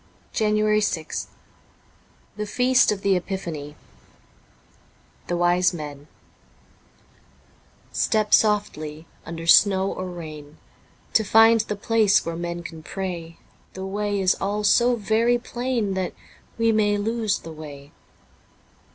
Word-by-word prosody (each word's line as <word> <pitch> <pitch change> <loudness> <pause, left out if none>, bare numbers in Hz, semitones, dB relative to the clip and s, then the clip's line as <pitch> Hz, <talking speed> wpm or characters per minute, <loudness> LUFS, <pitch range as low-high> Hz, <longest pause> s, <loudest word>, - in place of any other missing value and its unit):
* - - -34
JANUARY 215 0 +2
6th 165 -6 -2 1.1
THE 210 0 -4
FEAST 250 +3 +3
OF 200 -2 -4
THE 200 - +3
EPIPHANY 170 -6 -5 1.5
THE 175 - -1
WISE 175 +1 +2
MEN 145 -2 -8 1.8
STEP 215 -1 0
softly, 160 -8 +1 0.2
under 165 0 -6
snow 190 +2 +5
or 185 - -5
rain, 155 -3 -9 0.6
To 220 - +4
find 225 +2 +5
the 210 -1 -4
place 210 0 +2
where 165 0 -3
men 170 0 -5
can 165 -2 -9
pray; 170 -2 -6 0.4
The 190 0 -5
way 205 +1 -2
is 185 -1 +3
all 205 +2 -1
so 240 +4 +4
very 230 +2 +2
plain, 240 -4 -2
That 190 -1 -2 0.4
we 230 0 +3
may 210 -1 +2
lose 220 0 -1
the 165 - -10
way. 145 -2 -11
195 Hz, 120 wpm, -23 LUFS, 170-215 Hz, 1.8 s, snow